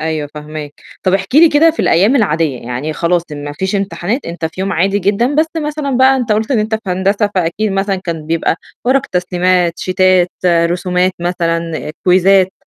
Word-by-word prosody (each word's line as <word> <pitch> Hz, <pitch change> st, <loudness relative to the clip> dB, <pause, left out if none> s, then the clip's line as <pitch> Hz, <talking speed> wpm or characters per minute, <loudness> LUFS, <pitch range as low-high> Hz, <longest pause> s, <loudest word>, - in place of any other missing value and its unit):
أيوه 155 Hz, -2 st, -3 dB
فاهماك. 150 Hz, -1 st, -7 dB, 0.3 s
طَب 185 Hz, 0 st, +2 dB
احكِ 195 Hz, +5 st, -3 dB
لي 325 Hz, +3 st, +7 dB
كده 310 Hz, +3 st, +4 dB
في 315 Hz, -, -4 dB
الأيام 200 Hz, +11 st, +3 dB
العادية، 160 Hz, -, 0 dB
يعني 125 Hz, +6 st, -4 dB
خلاص 170 Hz, +2 st, 0 dB
ما 145 Hz, 0 st, -6 dB
فيش 190 Hz, +6 st, -2 dB
إمتحانات، 200 Hz, +5 st, -3 dB
أنت 170 Hz, -1 st, -5 dB
في 165 Hz, +4 st, -4 dB
يوم 195 Hz, +1 st, -1 dB
عادي 195 Hz, +4 st, +1 dB
جدًا 205 Hz, +8 st, 0 dB
بس 310 Hz, +2 st, +3 dB
مثلًا 300 Hz, -2 st, -3 dB
بقى 265 Hz, +1 st, +5 dB
أنت 245 Hz, -4 st, 0 dB
قُلت 215 Hz, +3 st, -1 dB
إن 255 Hz, -, +2 dB
أنت 215 Hz, +1 st, -1 dB
في 220 Hz, -, -2 dB
هندسة 200 Hz, +3 st, 0 dB
فأكيد 190 Hz, +4 st, -1 dB
مثلًا 195 Hz, 0 st, 0 dB
كان 165 Hz, -4 st, -5 dB
بيبقى 165 Hz, 0 st, 0 dB, 0.3 s
ورق 260 Hz, +2 st, +2 dB
تسليمات، 180 Hz, -1 st, 0 dB
شيتات، 185 Hz, -1 st, +2 dB, 0.2 s
رسومات 180 Hz, +2 st, +1 dB
مثلًا 170 Hz, -2 st, -2 dB
كويزّات 190 Hz, +1 st, +4 dB
185 Hz, 180 wpm, -15 LUFS, 170-210 Hz, 0.3 s, لي